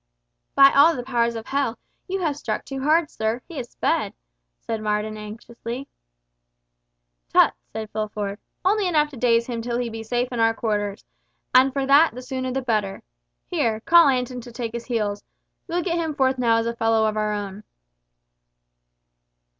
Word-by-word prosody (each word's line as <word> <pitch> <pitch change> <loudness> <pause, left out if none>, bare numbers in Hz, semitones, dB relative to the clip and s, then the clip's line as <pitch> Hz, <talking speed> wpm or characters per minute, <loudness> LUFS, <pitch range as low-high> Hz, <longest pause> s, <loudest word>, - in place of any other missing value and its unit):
"By 275 0 +8
all 315 +4 +6
the 245 - -4
powers 235 -2 0
of 225 0 -6
hell, 270 -4 -1 0.3
you 385 0 -2
have 310 -5 0
struck 225 -7 -4
too 270 -1 -5
hard, 310 +2 +2
sir. 220 +2 -1
He 330 -5 -6
is 240 -1 -6
sped," - - -1 0.4
said 225 -1 -4
Marden 210 0 -1
anxiously. 230 +4 -7 1.5
"Ass! - - +9
tut!" - - -1 0.2
said 220 0 -5
Fulford. 210 -1 -3 0.3
"Only 405 0 +3
enough 300 -3 +2
to - - -10
daze 235 -1 +3
him 235 -2 -4
till 235 +1 -2
he 245 -1 -2
be 225 0 -6
safe 245 +2 -1
in 240 - -3
our 225 0 +3
quarters—and 215 +5 -1
for 275 0 -1
that 280 0 +5
the 250 - -7
sooner 260 0 -3
the 265 +1 -2
better. 215 -5 -1 0.4
Here, 220 - 0
call 340 +4 +6
Anton 250 -2 0
to 240 - -11
take 235 -1 -4
his 235 0 -6
heels. 210 -4 -2 0.4
We'll 350 0 -1
get 340 -1 -1
him 320 -3 -2
forth 265 -2 +1
now 230 -2 +3
as 230 - 0
a 235 0 -2
fellow 225 -1 +2
of 215 0 0
our 215 0 0
own." 205 0 -5
235 Hz, 180 wpm, -23 LUFS, 220-275 Hz, 1.5 s, Ass